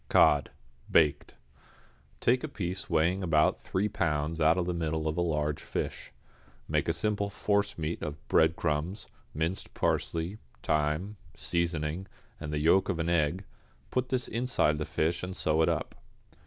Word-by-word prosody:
=Cod, 75 -2 +5 0.4
Baked.= 75 -3 +3 0.9
Take 125 +2 +3
a - - -1
piece 95 - -5
weighing 85 +5 +2
about 80 -4 +3
three 95 +3 0
pounds 80 -3 -1
out 80 +3 +5
of 90 - +1
the 90 - -1
middle 80 -2 -1
of 80 - -1
a 85 - 0
large 75 -3 0
fish. - - -4 0.6
Make - - 0
a - - +3
simple 100 -1 -1
forcemeat 100 -6 -1
of 75 -1 -6
breadcrumbs, 80 +3 +1 0.3
minced 80 +5 -2
parsley, 85 +6 -1 0.2
thyme, 75 +7 0 0.2
seasoning, 85 +1 -2 0.3
and 75 -1 -5
the 75 - -1
yolk 85 +7 +4
of 90 - 0
an 80 +1 -1
egg; 85 +2 +1 0.5
put 125 0 0
this 130 -1 -1
inside 115 - +1
the 75 - -1
fish 85 +2 0
and 90 0 -5
sew 80 +1 +2
it - - +4
up. - - -2
85 Hz, 155 wpm, -29 LUFS, 75-95 Hz, 0.9 s, =Cod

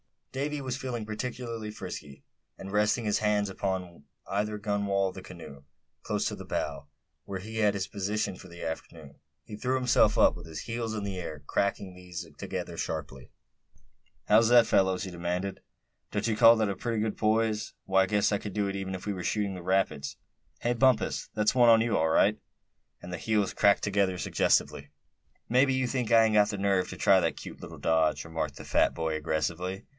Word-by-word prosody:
Davy 145 +2 -3
was 130 -2 -3
feeling 125 -5 -4
particularly 115 0 -5
frisky; 70 -8 -8 0.3
and 95 - -8
resting 105 +3 +2
his 105 -1 +1
hands, 105 -1 +1
one 95 - -9 0.3
upon 85 -4 -16 0.2
either 105 +2 -2
gunwale 100 -2 0
of - - -10
the 95 - -7
canoe, 80 -7 -11 0.4
close - - -1
to - - -5
the - - -9
bow, - - -3 0.4
where 95 -1 -5
he 110 +4 -8
had 105 -2 +3
his 100 -2 -2
position 100 -1 -2
for 95 - -12
the 85 -1 -10
afternoon, 80 -2 -7 0.2
he 105 - -9
threw 130 +4 0
himself 125 -4 +3
up, - - +5
with 85 -1 -10
his 80 -1 -6
heels 115 -1 -3
in 105 - -3
the 95 -2 -4
air, 75 -4 -7
cracking 100 -1 -1
these 90 -1 -8
together - - -5
sharply. - - -5 1.0
"How's 110 +2 +5
that, 120 -1 +7
fellows?" 95 -2 +2
he 95 - -6
demanded. 90 +2 -3 0.5
"Don't - - -1
you 110 -2 0
call 115 0 +8
that 110 -2 +1
a 100 - -3
pretty 115 -3 -2
good 110 -1 -2
poise? 110 0 +1
Why, 95 0 +3
I - - -1
guess 105 +1 +2
I 100 - +2
could 100 0 -7
do 105 0 0
it 100 - -4
even 95 -1 -4
if 90 - -8
we 105 - -1
were 90 -2 -6
shooting 105 -2 0
the 90 - -7
rapids. 85 -6 0 0.5
Hey, 120 - +1
Bumpus, 130 -1 +2
that's 105 -1 +2
one 120 -2 +6
on 115 -1 +7
you, 115 -1 +1
all 80 0 +2
right," - - +3 0.6
and 90 - -9
the 90 - -3
heels 105 +1 0
cracked 100 0 +3
together 100 -2 +1
suggestively. - - +1 0.6
"Mebbe 130 +3 +4
you 130 0 +1
think 125 -3 -2
I 115 -1 +6
ain't 110 -1 +2
got 105 0 +5
the 105 - -3
nerve 95 -2 +1
to - - -7
try - - +5
that - - 0
cute - - -9
little - - -9
dodge," 80 -1 +1
remarked 80 -2 -4
the - - -9
fat - - +2
boy, 80 -1 -1
aggressively. 80 +5 -2
100 Hz, 205 wpm, -29 LUFS, 90-110 Hz, 1.0 s, call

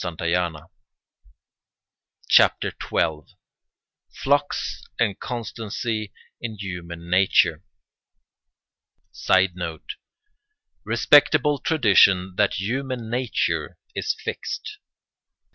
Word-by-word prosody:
] - - -4 2.2
CHAPTER - - +4 0.2
XII—FLUX 135 - -3 0.2
AND 110 -5 0
CONSTANCY 110 -2 -4 0.3
IN 110 -2 -5
HUMAN 85 -3 -7
NATURE 95 +2 +3 1.5
[Sidenote: 90 -3 0 0.9
Respectable 145 -1 +4
tradition 95 - +4
that 105 -2 +2
human 120 +2 -3
nature 125 0 -1 0.2
is - - -2
fixed. - - -6
105 Hz, 60 wpm, -23 LUFS, 95-125 Hz, 2.2 s, CHAPTER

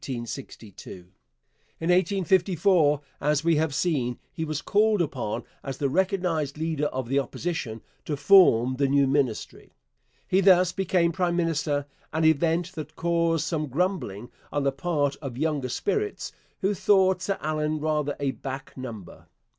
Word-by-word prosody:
In 125 -3 -3
1854, 155 - -1 0.2
as 150 +1 +1
we 165 -1 +3
have 155 -2 0
seen, 130 -9 0 0.2
he 160 - -4
was 155 -2 -3
called 215 0 +3
upon, 130 -10 -2 0.2
as 135 -1 -6
the 140 - 0
recognized 175 -4 0
leader 155 -2 -1
of 130 -3 -4
the 135 +3 +2
Opposition, 135 -6 -4 0.2
to 150 - -2
form 135 - +5
the 140 0 +2
new 140 0 +3
Ministry. 135 -5 -2 0.5
He 190 +1 +3
thus 185 -2 +5
became 180 -3 +1
prime 175 0 0
minister, 155 -4 0 0.3
an 160 0 0
event 165 +3 +2
that 155 -5 -8
caused 170 -2 +1
some 160 -2 -2
grumbling 140 - -2 0.2
on 145 - -1
the 140 - +2
part 145 -1 -1
of 135 -5 -7
younger 145 -3 -1
spirits 420 - -2 0.3
who 195 +2 +1
thought 190 -1 +3
Sir 195 +2 -1
Allan 155 0 -1
rather 150 -2 -1
a 140 -2 0
'back 135 0 -7
number.' 115 -8 -9
155 Hz, 145 wpm, -26 LUFS, 135-175 Hz, 0.5 s, form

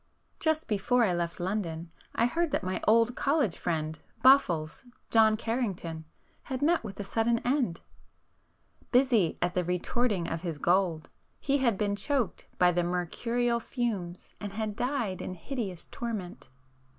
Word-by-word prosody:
Just 315 0 +1
before 230 +4 +2
I 195 -5 +2
left 170 -1 -2
London 175 -3 -3 0.2
I 230 - +3
heard 335 +7 +1
that 290 - -1
my 185 0 -2
old 230 +2 +4
college 280 - +1
friend 155 -2 -2 0.2
'Boffles,' 175 - +4 0.3
John 220 -1 +5
Carrington, 195 -9 -3 0.4
had 260 +1 -3
met 335 +3 +3
with 195 - -8
a - - -2
sudden 225 +3 +1
end. 245 - +1 1.1
Busy 245 -9 +3
at 175 0 0
the 180 - +1
'retorting' 180 +2 0
of 165 - -3
his 170 -4 -4
gold, 175 -1 +1 0.3
he 280 0 +1
had 235 -6 +2
been 205 -1 0
choked 250 +3 -1
by 180 0 +5
the 175 0 +1
mercurial 230 +8 0
fumes 210 -8 -4
and 205 -1 -6
had 215 -1 -3
died 240 -5 -1
in 185 - -5
hideous 195 - -5
torment. 210 - -6
210 Hz, 150 wpm, -29 LUFS, 175-245 Hz, 1.1 s, John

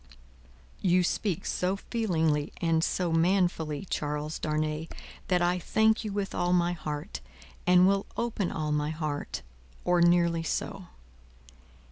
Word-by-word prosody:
"You 180 -1 +3
speak 180 0 -1
so 180 +2 0
feelingly 160 -10 0
and 165 -1 +2
so 175 -1 0
manfully, 165 -2 +1
Charles 150 -2 -3
Darnay, 155 +1 -1 0.4
that 180 -2 +2
I 175 +1 +2
thank 220 +4 +2
you 215 - -3
with 200 -1 -3
all 175 0 +1
my 175 0 +2
heart, 150 - -5 0.5
and 180 0 +6
will 195 0 +1
open 225 -5 -1
all 155 -1 -2
my 150 0 0
heart 155 - -4 0.4
or 175 -1 +3
nearly 170 -1 +4
so. 165 - -3
175 Hz, 130 wpm, -28 LUFS, 155-185 Hz, 0.5 s, and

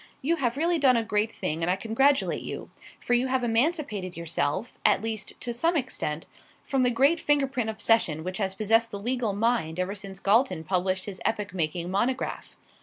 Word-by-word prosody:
You 335 +5 +2
have 250 -3 -1
really 335 +2 +2
done 260 -4 +5
a 230 - +1
great 215 0 0
thing, 160 -5 -3
and 165 - +1
I 180 - +3
congratulate 265 +8 +2
you; - - -7 0.3
for 245 - -1
you 245 +2 +3
have 260 -1 0
emancipated 225 - 0
yourself, 170 +5 -2
at 195 - +3
least 220 -2 -4
to 240 - -3
some 330 +8 +1
extent, 165 - -3 0.4
from 270 -2 0
the 250 - +4
great 275 +8 +3
finger 290 -2 +3
print 255 -4 -2
obsession, 220 -8 +1
which 185 +3 -4
has 190 -2 -1
possessed 225 +3 +2
the 200 - -5
legal 235 0 -1
mind 205 -6 0
ever 185 +2 -1
since 195 -2 -8
Galton 200 -5 +2
published 185 +2 0
his 195 -3 -8
epoch 210 -3 -1
making 170 0 -2
monograph. 245 +7 -2
225 Hz, 190 wpm, -27 LUFS, 190-255 Hz, 0.4 s, done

